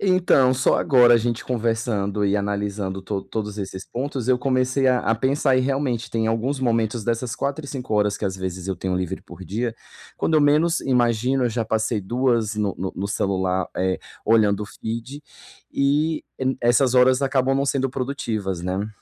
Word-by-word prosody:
Então, 180 Hz, -9 st, +4 dB
só 130 Hz, -, +2 dB
agora 125 Hz, -5 st, +5 dB
a -, -, +7 dB
gente 115 Hz, 0 st, -1 dB
conversando 110 Hz, -4 st, -1 dB
e 100 Hz, +1 st, +2 dB
analisando 100 Hz, -1 st, -2 dB
to 95 Hz, 0 st, -3 dB
todos 105 Hz, -2 st, -5 dB
esses 95 Hz, -1 st, -6 dB
pontos, 130 Hz, -1 st, -4 dB
eu 125 Hz, -1 st, +4 dB
comecei 130 Hz, +1 st, +1 dB
a 125 Hz, -1 st, +4 dB
a 115 Hz, -, +1 dB
pensar, 130 Hz, +2 st, +1 dB
e -, -, +3 dB
realmente, 130 Hz, -4 st, -1 dB
tem 110 Hz, -1 st, 0 dB
alguns 125 Hz, +5 st, -1 dB
momentos 115 Hz, -2 st, 0 dB
dessas 115 Hz, 0 st, -1 dB
4 140 Hz, +2 st, -3 dB
e 140 Hz, -, -8 dB
5 125 Hz, -5 st, -4 dB
horas 105 Hz, -1 st, +2 dB
que -, -, -4 dB
às 95 Hz, -1 st, -2 dB
vezes 95 Hz, -1 st, -5 dB
eu 95 Hz, -, -2 dB
tenho 90 Hz, 0 st, -2 dB
livre 90 Hz, -2 st, -3 dB
por 95 Hz, -, -12 dB
dia, 115 Hz, +6 st, -2 dB, 0.4 s
quando 160 Hz, -, 0 dB
eu 155 Hz, -, +5 dB
menos 155 Hz, +4 st, +3 dB
imagino, 125 Hz, 0 st, +1 dB
eu 120 Hz, -, +2 dB
já 115 Hz, 0 st, -2 dB
passei 110 Hz, 0 st, 0 dB
2 115 Hz, 0 st, 0 dB
no 105 Hz, -3 st, -1 dB
no 95 Hz, +1 st, -4 dB
no 100 Hz, +2 st, -3 dB
celular, 95 Hz, -2 st, 0 dB
eh, 95 Hz, 0 st, 0 dB, 0.3 s
olhando 105 Hz, -2 st, +4 dB
o -, -, -5 dB
feed 115 Hz, +7 st, -6 dB, 0.5 s
e 150 Hz, +3 st, +1 dB
n 130 Hz, 0 st, 0 dB
essas 120 Hz, +2 st, +3 dB
horas 130 Hz, +1 st, +5 dB
acabam 135 Hz, -1 st, +2 dB
não 140 Hz, -, +1 dB
sendo 135 Hz, -1 st, +1 dB
produtivas, 115 Hz, -9 st, -3 dB
né. 95 Hz, +3 st, -2 dB
115 Hz, 190 wpm, -23 LUFS, 105-130 Hz, 0.5 s, a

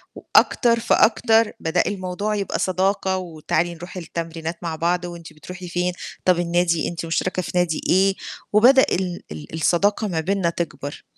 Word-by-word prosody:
وأكتر 235 Hz, -2 st, +3 dB
فأكتر 225 Hz, 0 st, +3 dB
بدأ 160 Hz, +2 st, +1 dB
الموضوع 200 Hz, +2 st, -2 dB
يبقى 200 Hz, -1 st, -2 dB
صداقة، 190 Hz, +1 st, 0 dB
وتعالي 170 Hz, 0 st, -2 dB
نروح 175 Hz, +3 st, -9 dB
التمرينات 165 Hz, -1 st, -5 dB
مع 165 Hz, -1 st, -3 dB
بعض. 175 Hz, +2 st, 0 dB
وأنتِ 170 Hz, -2 st, -9 dB
بتروحي 180 Hz, +3 st, -9 dB
فين؟ 180 Hz, +1 st, -1 dB, 0.3 s
طب 180 Hz, -2 st, +4 dB
النادي 170 Hz, -1 st, +1 dB
أنتِ 170 Hz, -1 st, -5 dB
مشتركة 185 Hz, +2 st, -1 dB
في -, -, -6 dB
نادي 175 Hz, -3 st, +1 dB
إيه؟ 190 Hz, +1 st, +4 dB, 0.4 s
وبدأ 255 Hz, +5 st, +7 dB
ال 180 Hz, -1 st, -2 dB
ال 75 Hz, 0 st, -9 dB
الصداقة 200 Hz, +7 st, +1 dB
ما 165 Hz, -4 st, -2 dB
بيننا 185 Hz, +1 st, 0 dB
تكبر. 150 Hz, -4 st, -5 dB
180 Hz, 150 wpm, -22 LUFS, 170-195 Hz, 0.4 s, وبدأ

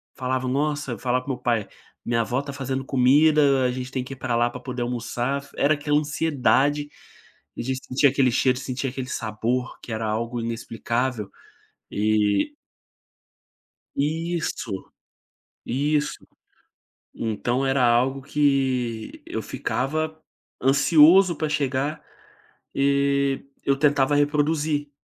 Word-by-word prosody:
falava: 130 Hz, -1 st, -2 dB
"Nossa", 145 Hz, +1 st, -1 dB
eu -, -, -8 dB
falava 125 Hz, 0 st, 0 dB
com 140 Hz, -, -2 dB
o -, -, -1 dB
meu 125 Hz, -, -16 dB
pai: 115 Hz, -4 st, 0 dB, 0.4 s
"Minha 115 Hz, 0 st, +1 dB
avó 120 Hz, +4 st, -1 dB
tá 140 Hz, 0 st, -7 dB
fazendo 135 Hz, -1 st, -3 dB
comida, 140 Hz, +1 st, +4 dB
a 125 Hz, -, +2 dB
gente 130 Hz, +1 st, -5 dB
tem 130 Hz, -1 st, -2 dB
que 135 Hz, -, -8 dB
ir -, -, -8 dB
para 125 Hz, -1 st, -2 dB
lá 120 Hz, +1 st, +2 dB
para -, -, -8 dB
poder 125 Hz, -2 st, -5 dB
almoçar", 120 Hz, +3 st, -2 dB
f 140 Hz, -, -17 dB
era 145 Hz, +2 st, +4 dB
aquela 145 Hz, 0 st, +1 dB
ansiedade, 145 Hz, -1 st, +1 dB, 0.7 s
a -, -, -2 dB
gente 130 Hz, +2 st, -2 dB
sentia 135 Hz, +2 st, +4 dB
aquele 130 Hz, -2 st, +2 dB
cheiro, 130 Hz, +1 st, +2 dB
sentia 130 Hz, +1 st, -3 dB
aquele 130 Hz, 0 st, -5 dB
sabor 115 Hz, +3 st, -2 dB
que -, -, -9 dB
era 110 Hz, 0 st, -2 dB
algo 115 Hz, +2 st, -2 dB
inexplicável. 115 Hz, 0 st, -2 dB, 0.6 s
E 105 Hz, -, +1 dB, 1.4 s
Isso. 155 Hz, -, -2 dB, 0.8 s
Isso. 145 Hz, +4 st, 0 dB, 1.0 s
Então 120 Hz, +4 st, -1 dB
era 135 Hz, -1 st, +2 dB
algo 125 Hz, +3 st, +3 dB
que, 130 Hz, -5 st, 0 dB
eu -, -, -3 dB
ficava 155 Hz, +4 st, -2 dB, 0.4 s
ansioso 160 Hz, +6 st, +6 dB
para 155 Hz, -, -1 dB
chegar, 145 Hz, 0 st, -1 dB, 0.7 s
e 140 Hz, 0 st, +1 dB, 0.2 s
eu 140 Hz, -, +2 dB
tentava 145 Hz, -1 st, +3 dB
reproduzir 145 Hz, 0 st, +1 dB
135 Hz, 130 wpm, -24 LUFS, 125-145 Hz, 1.4 s, ansioso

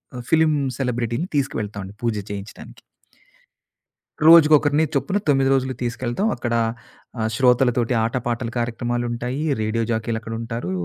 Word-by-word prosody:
ఆహ్, 125 Hz, -, -6 dB
ఫిల్మ్ 160 Hz, -1 st, +4 dB, 0.2 s
సెలబ్రిటీని 120 Hz, +4 st, -2 dB
తీసుకవెళ్తామండి 105 Hz, -7 st, -3 dB
పూజ 115 Hz, -2 st, 0 dB, 0.2 s
చేయించడానికి. 100 Hz, +1 st, -9 dB, 1.5 s
రోజుకొకరిని 155 Hz, -2 st, +6 dB
చొప్పున 190 Hz, +8 st, 0 dB
9 135 Hz, -1 st, +3 dB
రోజులు 130 Hz, 0 st, 0 dB
తీసుకెళ్తాం. 120 Hz, -, -2 dB
అక్కడ 120 Hz, -1 st, -3 dB, 0.7 s
ఆహ్, 110 Hz, 0 st, 0 dB
శ్రోతలతోటి 125 Hz, -1 st, +2 dB
ఆట, 115 Hz, +2 st, -2 dB
పాాటల 120 Hz, 0 st, -2 dB
కార్యక్రమాలుంటాయి. 120 Hz, +2 st, -2 dB, 0.2 s
రేడియో 110 Hz, +1 st, -1 dB
జాకీలక్కడ 110 Hz, 0 st, -3 dB
ఉంటారు. 115 Hz, -5 st, -5 dB
120 Hz, 110 wpm, -22 LUFS, 115-135 Hz, 1.5 s, రోజుకొకరిని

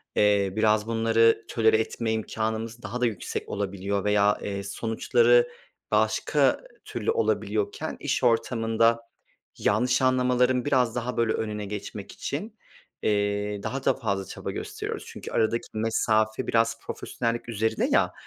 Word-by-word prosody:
eee, 100 Hz, -2 st, +3 dB
biraz 110 Hz, 0 st, +2 dB
bunları 115 Hz, 0 st, +3 dB
tolere 110 Hz, -1 st, +3 dB
etme 110 Hz, 0 st, -2 dB
imkânımız 110 Hz, +1 st, -3 dB
daha 125 Hz, +1 st, -5 dB
da -, -, +4 dB
yüksek 110 Hz, -6 st, -3 dB
olabiliyor 100 Hz, 0 st, -2 dB
veya, 105 Hz, 0 st, +3 dB
eee, 100 Hz, -1 st, -4 dB
sonuçları 290 Hz, -, +3 dB, 0.4 s
başka -, -, +2 dB, 0.2 s
türlü -, -, -2 dB
olabiliyorken, 430 Hz, -2 st, -1 dB
iş -, -, -1 dB
ortamında 115 Hz, -1 st, +2 dB, 0.6 s
yanlış 125 Hz, +6 st, +2 dB
anlamaların 125 Hz, -1 st, +2 dB
biraz 125 Hz, -5 st, +2 dB
daha 120 Hz, +1 st, -3 dB
böyle 115 Hz, -2 st, +2 dB
önüne 105 Hz, -1 st, -3 dB
geçmek 105 Hz, 0 st, -6 dB
için, 210 Hz, +10 st, -5 dB, 0.5 s
eee, 100 Hz, 0 st, 0 dB
daha 135 Hz, +1 st, -4 dB
da -, -, +4 dB
fazla 100 Hz, -6 st, -2 dB
çaba -, -, -6 dB
gösteriyoruz. -, -, -5 dB
Çünkü -, -, -8 dB
aradaki 115 Hz, +1 st, 0 dB
mesafe 110 Hz, 0 st, +1 dB
biraz 115 Hz, 0 st, +2 dB
profesyonellik 120 Hz, 0 st, -3 dB
üzerine 110 Hz, 0 st, 0 dB
ya, -, -, +3 dB
115 Hz, 130 wpm, -26 LUFS, 105-120 Hz, 0.6 s, da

